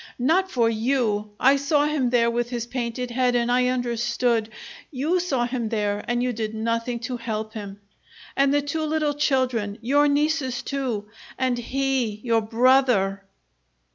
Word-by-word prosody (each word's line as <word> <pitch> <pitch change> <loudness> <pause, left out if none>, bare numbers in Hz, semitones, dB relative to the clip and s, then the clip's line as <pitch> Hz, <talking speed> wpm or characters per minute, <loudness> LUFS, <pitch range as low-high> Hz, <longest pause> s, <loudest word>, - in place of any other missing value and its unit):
"Not 340 +10 +2
for 235 -8 +2
you! 225 -2 0
I 270 +2 +5
saw 290 +1 +2
him 295 -5 0
there 235 -1 +3
with 240 0 -1
his 240 -2 -3
painted 245 0 -4
head 250 0 +1
and 240 0 +1
I 250 0 +3
understood! 240 -2 0 0.4
You 305 +7 0
saw 275 -9 0
him 240 -2 -3
there, 210 -2 -1
and 240 0 0
you 250 -1 0
did 220 -1 -4
nothing 230 +2 -1
to 250 +1 -4
help 220 -2 -4
him! 200 -2 -7 0.6
And 275 0 +3
the 290 0 +2
two 290 +3 -3
little 305 -1 0
children 255 -8 0
your 285 +6 +3
nieces, 290 -3 0
too, 255 -7 -3 0.3
and 255 -1 +1
he 260 -4 -1
your 230 -2 +2
brother!" 225 -4 +3
245 Hz, 160 wpm, -24 LUFS, 230-270 Hz, 0.6 s, I